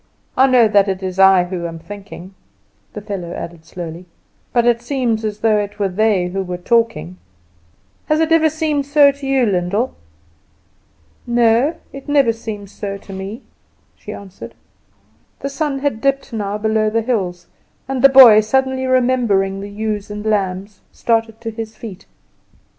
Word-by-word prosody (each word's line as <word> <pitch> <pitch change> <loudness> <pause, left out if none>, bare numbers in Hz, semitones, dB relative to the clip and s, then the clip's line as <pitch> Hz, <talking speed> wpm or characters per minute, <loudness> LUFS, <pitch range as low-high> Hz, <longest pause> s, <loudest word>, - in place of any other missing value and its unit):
I 265 +1 +5
know 250 -3 +5
that 205 -2 +3
it 190 0 -3
is 185 0 -4
I 190 -1 +6
who 175 -1 -4
am 165 0 -7
thinking," 195 +1 -10 0.6
the 210 - -7
fellow 190 -5 -5
added 165 -1 -8
slowly, 170 +1 -8 0.4
"but 240 -1 +2
it 235 -1 +2
seems 240 -3 -1
as 210 -1 -4
though 220 -2 +3
it 205 0 -5
were 200 -2 0
they 190 -2 +1
who 190 0 -4
are 180 - -3
talking. 175 - 0 0.9
Has 305 0 +2
it 320 0 +1
never 320 -1 +4
seemed 305 -3 -2
so 285 -1 +5
to 280 0 -9
you, 270 -2 +2
Lyndall?" 200 +4 -1 1.3
"No, 240 +5 +3 0.2
it 275 +1 -10
never 275 -5 +3
seems 210 -3 -8
so 200 -1 -5
to 195 0 -12
me," 195 +4 -7 0.5
she - - -10
answered. 195 -2 -10 0.9
The 275 - -3
sun 280 0 -2
had 270 -5 -2
dipped 275 -2 -1
now 205 -2 -3
below 215 0 +1
the 225 +1 0
hills, 185 -7 -2 0.4
and 265 -1 -2
the 275 - +8
boy, 255 -5 +9
suddenly 260 +3 0
remembering 240 -7 +1
the 200 - -7
ewes 210 0 -4
and 210 +1 -7
lambs, 200 -1 -2
started 225 -1 -1
to 225 -1 -4
his 220 0 -7
feet. 200 -4 -10
215 Hz, 165 wpm, -18 LUFS, 195-255 Hz, 1.3 s, boy